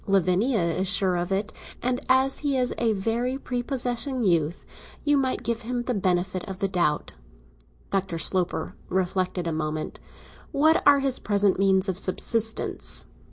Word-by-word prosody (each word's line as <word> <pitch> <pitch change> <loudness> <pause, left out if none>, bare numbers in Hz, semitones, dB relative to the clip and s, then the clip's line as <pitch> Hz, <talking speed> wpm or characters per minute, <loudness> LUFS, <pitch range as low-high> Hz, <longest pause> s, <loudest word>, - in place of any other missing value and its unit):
Lavinia 195 +5 +2
is 170 +3 -1
sure 190 -1 +4
of 175 +1 -2
it, 200 +2 -1 0.3
and, 250 0 -1
as 265 +1 +3
he 285 -2 0
is 250 -1 0
a 230 -2 +2
very 230 +6 -1
prepossessing 250 0 -1
youth, 170 -3 +1 0.4
you 290 0 +4
might 265 -2 0
give 235 0 -2
him 240 +1 -3
the 250 - -1
benefit 185 -2 0
of 190 - -5
the 195 - 0
doubt." 175 -5 0 0.8
Dr. 195 -3 -1
Sloper 180 +1 -1 0.2
reflected 185 -1 -1
a 165 - -1
moment. 155 0 -3 0.5
"What 315 +3 +3
are 285 -1 +6
his 270 -2 -1
present 200 -2 +1
means 190 0 +3
of 190 -1 -2
subsistence?" 220 +4 +1
200 Hz, 155 wpm, -25 LUFS, 185-250 Hz, 0.8 s, are